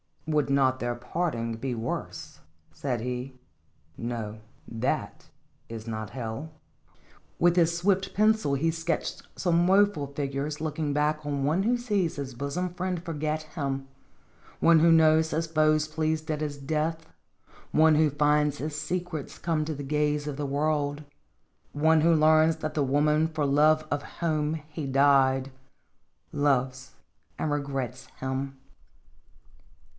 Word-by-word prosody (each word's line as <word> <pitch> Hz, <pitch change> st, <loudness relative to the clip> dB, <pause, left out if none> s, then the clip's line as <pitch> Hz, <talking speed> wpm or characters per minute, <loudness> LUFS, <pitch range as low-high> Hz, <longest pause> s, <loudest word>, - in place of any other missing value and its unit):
" -, -, -36 dB
Would 150 Hz, -2 st, +1 dB
not 130 Hz, -2 st, +2 dB
their 120 Hz, -1 st, -2 dB
parting 120 Hz, -3 st, -2 dB
be 125 Hz, +1 st, -3 dB
worse?" 115 Hz, 0 st, -5 dB, 0.3 s
said 125 Hz, -5 st, -3 dB
he. 125 Hz, +2 st, -4 dB, 0.3 s
" 75 Hz, +2 st, -27 dB
Nothat 110 Hz, +1 st, -4 dB, 0.4 s
is 115 Hz, -1 st, -7 dB
not 110 Hz, -2 st, -5 dB
hell." 125 Hz, +5 st, -5 dB, 0.9 s
With 175 Hz, 0 st, +4 dB
his 170 Hz, -1 st, +3 dB
swift 190 Hz, +2 st, +1 dB
pencil 215 Hz, -7 st, +2 dB
he 165 Hz, +4 st, +1 dB
sketched 165 Hz, 0 st, -3 dB
some 175 Hz, -1 st, +2 dB
woeful 195 Hz, -6 st, +3 dB
figures 140 Hz, +1 st, -3 dB
looking 155 Hz, -2 st, -2 dB
back 150 Hz, +1 st, 0 dB
one 145 Hz, +5 st, 0 dB
who 240 Hz, +3 st, +2 dB
sees 205 Hz, -8 st, -1 dB
his 140 Hz, -2 st, -5 dB
bosom 155 Hz, +8 st, -3 dB
friend 180 Hz, -1 st, -3 dB
forget 155 Hz, -2 st, -2 dB
him; 135 Hz, -4 st, -4 dB, 0.7 s
one 165 Hz, -1 st, +6 dB
who 165 Hz, +1 st, +5 dB
knows 160 Hz, 0 st, +5 dB
his 165 Hz, +1 st, -1 dB
foe 155 Hz, -1 st, +3 dB
pleased 155 Hz, +1 st, -2 dB
at 150 Hz, 0 st, -2 dB
his 145 Hz, -2 st, -3 dB
death; 155 Hz, +3 st, -2 dB, 0.7 s
one 160 Hz, 0 st, +5 dB
who 155 Hz, 0 st, +4 dB
finds 150 Hz, 0 st, +2 dB
his 150 Hz, +1 st, -4 dB
secrets 175 Hz, -3 st, -4 dB
come 160 Hz, -3 st, -1 dB
to 155 Hz, 0 st, -3 dB
the 140 Hz, -, -6 dB
gaze 150 Hz, +1 st, 0 dB
of 145 Hz, -2 st, -4 dB
the 145 Hz, -1 st, -2 dB
world; 145 Hz, +1 st, -1 dB, 0.7 s
one 155 Hz, +2 st, +4 dB
who 165 Hz, +1 st, +4 dB
learns 155 Hz, +1 st, +5 dB
that 155 Hz, -1 st, -4 dB
the 150 Hz, -, +1 dB
woman 150 Hz, +3 st, +2 dB
for 155 Hz, -2 st, -2 dB
love 155 Hz, +2 st, +4 dB
of 145 Hz, -, 0 dB, 0.2 s
whom 155 Hz, -2 st, 0 dB
he 155 Hz, -2 st, -5 dB
died 135 Hz, -1 st, +3 dB, 0.8 s
loves 130 Hz, -3 st, 0 dB, 0.4 s
and 155 Hz, -, -1 dB
regrets 135 Hz, -3 st, -3 dB, 0.2 s
him. 135 Hz, +1 st, -3 dB
150 Hz, 140 wpm, -27 LUFS, 135-160 Hz, 0.9 s, one